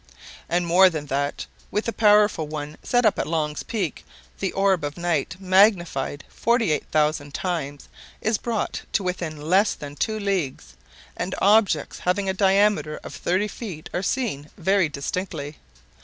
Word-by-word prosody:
And 175 Hz, +1 st, +1 dB
more 185 Hz, +3 st, +6 dB
than 155 Hz, -4 st, -5 dB
that, 140 Hz, +1 st, -1 dB, 0.2 s
with 210 Hz, -, -1 dB
the 230 Hz, -, -2 dB
powerful 210 Hz, -6 st, +4 dB
one 150 Hz, 0 st, -6 dB
set 245 Hz, -1 st, +1 dB
up 215 Hz, -, +3 dB
at -, -, -1 dB
Long's 150 Hz, -2 st, -1 dB
Peak, 195 Hz, -9 st, -3 dB, 0.4 s
the -, -, -1 dB
orb 195 Hz, -4 st, +2 dB
of 145 Hz, +2 st, -4 dB
night, 170 Hz, -5 st, -1 dB
magnified 185 Hz, -7 st, +2 dB
48,000 155 Hz, -, 0 dB
times, 150 Hz, -6 st, -3 dB, 0.3 s
is 220 Hz, 0 st, 0 dB
brought 230 Hz, -3 st, -2 dB
to 200 Hz, -, +1 dB
within 175 Hz, -4 st, -3 dB
less 185 Hz, +8 st, +2 dB
than 145 Hz, -1 st, -8 dB
two 215 Hz, +6 st, -1 dB
leagues, 185 Hz, -, -2 dB, 0.4 s
and 185 Hz, +1 st, -3 dB
objects 200 Hz, -6 st, +3 dB
having 195 Hz, +2 st, 0 dB
a 190 Hz, -, +1 dB
diameter 195 Hz, -5 st, +2 dB
of -, -, -8 dB
thirty 185 Hz, +4 st, 0 dB
feet 195 Hz, -7 st, -8 dB
are 180 Hz, -, -1 dB
seen 195 Hz, -, -2 dB
very 190 Hz, -1 st, +2 dB
distinctly. 150 Hz, 0 st, -4 dB
180 Hz, 150 wpm, -24 LUFS, 150-200 Hz, 0.4 s, more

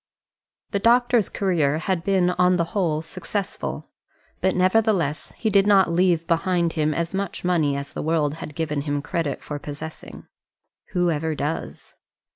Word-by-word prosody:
The 200 Hz, -, 0 dB
doctor's 240 Hz, 0 st, +3 dB
career 160 Hz, -7 st, +1 dB
had 170 Hz, +1 st, -1 dB
been 185 Hz, -2 st, +2 dB
on 180 Hz, 0 st, +3 dB
the 170 Hz, -, +2 dB
whole 160 Hz, -6 st, 0 dB
successful, 190 Hz, +4 st, -5 dB, 0.5 s
but 190 Hz, -, +1 dB
nevertheless 185 Hz, -5 st, +1 dB
he 220 Hz, -, 0 dB
did 200 Hz, 0 st, +4 dB
not 195 Hz, -4 st, +5 dB
leave 175 Hz, -2 st, +2 dB
behind 170 Hz, 0 st, +1 dB
him 155 Hz, -2 st, +1 dB
as 170 Hz, +1 st, -2 dB
much 195 Hz, -1 st, -3 dB
money 160 Hz, -6 st, +1 dB
as 140 Hz, +1 st, -6 dB
the -, -, -4 dB
world 155 Hz, -2 st, +1 dB
had 150 Hz, -, -7 dB
given 150 Hz, -3 st, -1 dB
him 145 Hz, -1 st, -2 dB
credit 165 Hz, -5 st, -2 dB
for 145 Hz, -1 st, -5 dB
possessing. 150 Hz, +2 st, -8 dB, 0.7 s
Who 175 Hz, -2 st, +2 dB
ever 160 Hz, 0 st, -1 dB
does? 150 Hz, +3 st, -4 dB
170 Hz, 155 wpm, -23 LUFS, 155-190 Hz, 0.7 s, not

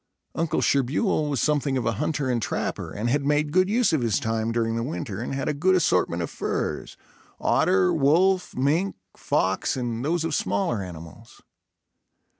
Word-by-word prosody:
Uncle 165 Hz, -1 st, -1 dB
Sherbuel 150 Hz, -, +1 dB
was 140 Hz, -4 st, -1 dB
something 145 Hz, -3 st, +1 dB
of 125 Hz, -, -2 dB
a 115 Hz, -, +2 dB
hunter 145 Hz, -3 st, -1 dB
and 120 Hz, -2 st, 0 dB
trapper, -, -, -3 dB
and 105 Hz, +3 st, -3 dB
had 140 Hz, +4 st, +1 dB
made 145 Hz, +1 st, +1 dB
good 185 Hz, +3 st, +3 dB
use 230 Hz, -3 st, +2 dB
of 155 Hz, -, +2 dB
his 115 Hz, -3 st, +1 dB
time 110 Hz, 0 st, -1 dB
during 115 Hz, -1 st, 0 dB
the 115 Hz, -, -1 dB
winter 115 Hz, -5 st, -4 dB
and 125 Hz, -, -4 dB
had 135 Hz, -, -3 dB
a -, -, +1 dB
good 185 Hz, +6 st, +2 dB
assortment 180 Hz, -, +1 dB
of -, -, -5 dB
furs, -, -, -3 dB, 0.4 s
otter, 95 Hz, -1 st, +3 dB
wolf, 180 Hz, +6 st, +2 dB
mink, 155 Hz, +9 st, +1 dB, 0.2 s
fox 95 Hz, +7 st, 0 dB
and 120 Hz, -2 st, -3 dB
those 165 Hz, +3 st, 0 dB
of 165 Hz, -1 st, -2 dB
smaller 100 Hz, 0 st, 0 dB
animals. 85 Hz, -4 st, -11 dB
135 Hz, 175 wpm, -25 LUFS, 115-155 Hz, 0.4 s, good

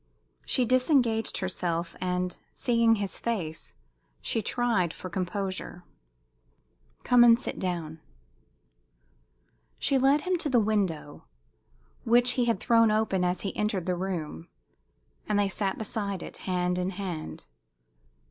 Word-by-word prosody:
She 255 Hz, -, +2 dB
disengaged 250 Hz, -3 st, +2 dB
herself, 175 Hz, -2 st, -2 dB
and, 180 Hz, 0 st, -1 dB, 0.2 s
seeing 230 Hz, -1 st, +3 dB
his 200 Hz, -2 st, -3 dB
face, 175 Hz, -9 st, -4 dB, 0.4 s
she 225 Hz, -, -1 dB
tried 225 Hz, -9 st, 0 dB
for 185 Hz, -, -8 dB
composure. 185 Hz, -1 st, -4 dB, 1.2 s
"Come 245 Hz, -1 st, +6 dB
and 235 Hz, 0 st, +7 dB
sit -, -, -4 dB
down." 165 Hz, -4 st, -3 dB, 1.8 s
She 275 Hz, -1 st, +2 dB
led 275 Hz, +3 st, +4 dB
him 365 Hz, 0 st, 0 dB
to 305 Hz, -, -1 dB
the 250 Hz, -3 st, +4 dB
window, 195 Hz, -9 st, -1 dB, 0.8 s
which 245 Hz, +2 st, +5 dB
he 250 Hz, -1 st, +1 dB
had 230 Hz, -5 st, +1 dB
thrown 230 Hz, -2 st, +4 dB
open 215 Hz, -4 st, +1 dB
as 180 Hz, +1 st, 0 dB
he 195 Hz, -, -4 dB
entered 210 Hz, -4 st, -1 dB
the 180 Hz, -, 0 dB
room, 175 Hz, -3 st, -4 dB, 0.8 s
and 210 Hz, -, +2 dB
they 205 Hz, -1 st, +3 dB
sat 195 Hz, 0 st, -2 dB
beside 200 Hz, -4 st, -4 dB
it, -, -, -8 dB
hand 180 Hz, -1 st, -1 dB
in 180 Hz, +1 st, -1 dB
hand. 180 Hz, -6 st, -5 dB
200 Hz, 130 wpm, -28 LUFS, 180-235 Hz, 1.8 s, and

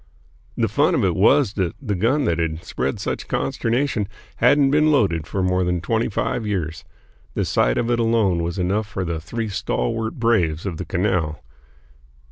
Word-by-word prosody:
The -, -, +2 dB
fun -, -, +2 dB
of -, -, +2 dB
it -, -, +1 dB
was 130 Hz, -8 st, +4 dB
that 95 Hz, -5 st, -1 dB
the 115 Hz, -7 st, -3 dB
gun 120 Hz, +9 st, +1 dB
that 85 Hz, -5 st, 0 dB
had 80 Hz, 0 st, -2 dB
spread 70 Hz, -, -3 dB
such -, -, -3 dB
consternation 120 Hz, -3 st, -1 dB, 0.3 s
hadn't 135 Hz, +3 st, +4 dB
been 150 Hz, +1 st, +4 dB
loaded 95 Hz, -, +1 dB
for 95 Hz, -, -2 dB
more 90 Hz, 0 st, +1 dB
than 90 Hz, 0 st, 0 dB
twenty 110 Hz, +8 st, 0 dB
five 110 Hz, +3 st, -1 dB
years. 85 Hz, -6 st, -3 dB, 0.5 s
The -, -, 0 dB
sight -, -, +2 dB
of 120 Hz, -, 0 dB
it 120 Hz, -, +1 dB
alone 110 Hz, -7 st, +2 dB
was 85 Hz, +2 st, -3 dB
enough 100 Hz, +4 st, 0 dB
for 95 Hz, -3 st, -4 dB
the 85 Hz, -1 st, -2 dB
three 115 Hz, +8 st, -4 dB
stalwart 105 Hz, -, -2 dB
braves 100 Hz, -10 st, +1 dB
of 90 Hz, -5 st, -3 dB
the 90 Hz, -, -5 dB
canal. 85 Hz, -5 st, 0 dB
95 Hz, 180 wpm, -22 LUFS, 85-115 Hz, 0.5 s, was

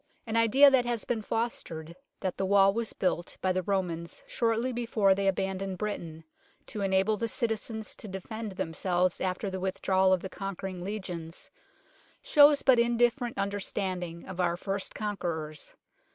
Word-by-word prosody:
An 225 Hz, -1 st, -3 dB
idea 260 Hz, +5 st, +7 dB
that 260 Hz, -2 st, +4 dB
has 240 Hz, -2 st, -1 dB
been 230 Hz, -2 st, -1 dB
fostered 170 Hz, -8 st, -3 dB, 0.3 s
that 185 Hz, -2 st, -2 dB
the 195 Hz, -, 0 dB
wall 195 Hz, 0 st, +5 dB
was 230 Hz, 0 st, -1 dB
built 180 Hz, -2 st, -2 dB
by 185 Hz, -1 st, +1 dB
the 185 Hz, -, 0 dB
Romans 175 Hz, -3 st, -2 dB
shortly 230 Hz, +2 st, 0 dB
before 230 Hz, -5 st, +2 dB
they 195 Hz, 0 st, 0 dB
abandoned 190 Hz, 0 st, -1 dB
Britain, 170 Hz, -6 st, -4 dB, 0.4 s
to 210 Hz, -, -5 dB
enable 195 Hz, +2 st, +2 dB
the 230 Hz, -, -1 dB
citizens 220 Hz, -2 st, -2 dB
to -, -, -6 dB
defend 210 Hz, +2 st, -6 dB
themselves 180 Hz, +1 st, 0 dB
after 185 Hz, +2 st, -1 dB
the 190 Hz, -1 st, -3 dB
withdrawal 190 Hz, 0 st, +2 dB
of 185 Hz, -2 st, +3 dB
the -, -, -3 dB
conquering 190 Hz, -1 st, -5 dB
legions, 180 Hz, -5 st, -5 dB, 0.7 s
shows 290 Hz, -1 st, +6 dB
but 260 Hz, -3 st, +6 dB
indifferent 240 Hz, +1 st, +2 dB
under 200 Hz, +1 st, -1 dB
standing 180 Hz, -4 st, -3 dB
of 185 Hz, -1 st, -7 dB
our 175 Hz, -1 st, +1 dB
first 195 Hz, +1 st, -3 dB
conquerors. 170 Hz, -7 st, -4 dB
195 Hz, 155 wpm, -29 LUFS, 185-225 Hz, 0.7 s, idea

